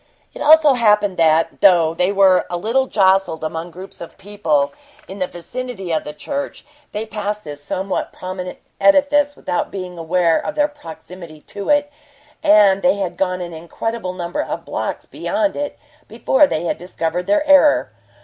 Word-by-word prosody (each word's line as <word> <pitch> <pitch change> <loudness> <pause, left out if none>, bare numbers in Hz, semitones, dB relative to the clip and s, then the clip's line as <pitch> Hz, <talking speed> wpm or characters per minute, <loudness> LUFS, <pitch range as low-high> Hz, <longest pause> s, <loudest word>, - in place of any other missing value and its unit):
It - - -10
also 305 -1 +6
happened 210 -5 +2
that, 165 -1 +2
though 170 -5 +5
they 180 +3 +1
were 195 -2 +4
a 175 - -2
little 235 +8 0
jostled 190 -6 +2
among 160 +2 -4
groups 185 +3 -11
of 170 - -10
people 165 -9 -1 0.3
in 195 +1 -9
the 185 - -1
vicinity 195 +1 -7
of 155 - -1
the 150 - -5
church, 280 - -6 0.3
they 210 +1 -4
passed 210 -1 -4
this 145 -1 -9
somewhat 190 +5 -3
prominent 185 0 -7 0.2
edifice 290 0 +3
without 175 - -3
being 180 -3 -7
aware 165 0 +2
of 205 - -4
their 295 0 +2
proximity 170 - -12
to 200 +4 -7
it, 290 0 +2 0.5
and 200 -2 +5
they 270 - +3
had 195 -3 -3
gone 185 -1 -1
an 170 -1 -6
incredible 185 +5 -5
number 175 -1 -3
of - - -5
blocks - - -4
beyond 305 -1 -2
it 290 0 -4 0.3
before 260 +6 +3
they 170 - -1
discovered 175 0 -4
their 305 0 +1
error. 290 +1 +5
190 Hz, 165 wpm, -19 LUFS, 175-235 Hz, 0.5 s, also